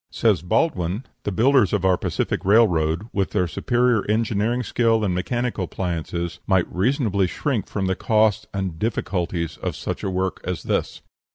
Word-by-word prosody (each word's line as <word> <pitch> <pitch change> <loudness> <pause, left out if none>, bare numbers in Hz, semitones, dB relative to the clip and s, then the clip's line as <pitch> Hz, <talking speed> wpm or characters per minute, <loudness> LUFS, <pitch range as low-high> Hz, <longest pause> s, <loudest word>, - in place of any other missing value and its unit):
Says - - +2
Baldwin, 90 - 0 0.2
"The 105 - 0
builders 120 +2 +3
of 100 -3 +1
our 95 -1 +5
Pacific - - -2
Railroad, 90 -6 +3
with 100 -1 0
their 90 - 0
superior 120 - +1
engineering 110 +2 +1
skill 115 -1 +2
and 95 - 0
mechanical 120 +2 -1
appliances, 85 -1 -4
might 95 -3 +3
reasonably 100 -2 +1
shrink 115 +1 -2
from 100 -2 -2
the 95 0 0
cost 110 -1 +2
and 95 -2 -2
the 80 - -14
difficulties 90 -7 -2
of - - -4
such - - -5
a - - -1
work 95 0 -2
as 90 -2 -4
this. - - -2
100 Hz, 165 wpm, -23 LUFS, 90-115 Hz, 0.2 s, our